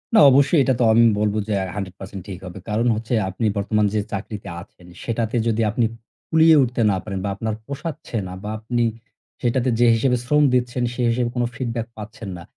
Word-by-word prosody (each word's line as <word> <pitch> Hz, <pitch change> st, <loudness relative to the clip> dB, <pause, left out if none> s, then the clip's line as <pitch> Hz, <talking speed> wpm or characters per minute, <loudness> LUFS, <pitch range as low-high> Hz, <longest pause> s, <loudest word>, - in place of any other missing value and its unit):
না। -, -, +8 dB
অবশ্যই 140 Hz, +4 st, +4 dB
এটা 130 Hz, -, +2 dB
তো -, -, +3 dB
আমি 115 Hz, +1 st, +6 dB, 0.2 s
বলব 105 Hz, -1 st, +1 dB
যে, 110 Hz, -, -1 dB
আ -, -, -3 dB
১০০% 95 Hz, 0 st, -7 dB, 0.2 s
ঠিক 95 Hz, -3 st, -7 dB
হবে। 90 Hz, +1 st, -8 dB
কারণ 110 Hz, +3 st, +1 dB
হচ্ছে 115 Hz, +3 st, -4 dB, 0.2 s
আপনি 95 Hz, +5 st, -3 dB
বর্তমান 105 Hz, +1 st, +1 dB
যে 110 Hz, -, +1 dB
চাকরিতে 100 Hz, +1 st, -5 dB
আছেন 90 Hz, 0 st, -17 dB, 0.2 s
সেটাতে 115 Hz, 0 st, -2 dB
যদি 115 Hz, 0 st, +1 dB
আপনি 115 Hz, +2 st, +1 dB, 0.4 s
কুলিয়ে 160 Hz, 0 st, +6 dB
উঠতে 125 Hz, -1 st, -2 dB
না 95 Hz, -, 0 dB
পারেন 100 Hz, -3 st, -4 dB
বা 100 Hz, -, -1 dB
আপনার 110 Hz, +1 st, -3 dB
পোষাচ্ছে 140 Hz, -1 st, -6 dB
না 90 Hz, -, -7 dB
বা 105 Hz, -, -4 dB
আপনি 120 Hz, +2 st, -1 dB, 0.6 s
সেটাতে 125 Hz, +1 st, +1 dB
যে 120 Hz, -, +5 dB
হিসেবে 125 Hz, +2 st, +2 dB
শ্রম 150 Hz, +4 st, +3 dB
দিচ্ছেন 125 Hz, 0 st, 0 dB
সে 125 Hz, -, -4 dB
হিসেবে 120 Hz, +1 st, 0 dB
কোন 120 Hz, -, +1 dB
feedback 120 Hz, -3 st, -3 dB
পাচ্ছেন 105 Hz, 0 st, -8 dB
না, 85 Hz, -, -10 dB
115 Hz, 200 wpm, -22 LUFS, 105-125 Hz, 0.6 s, না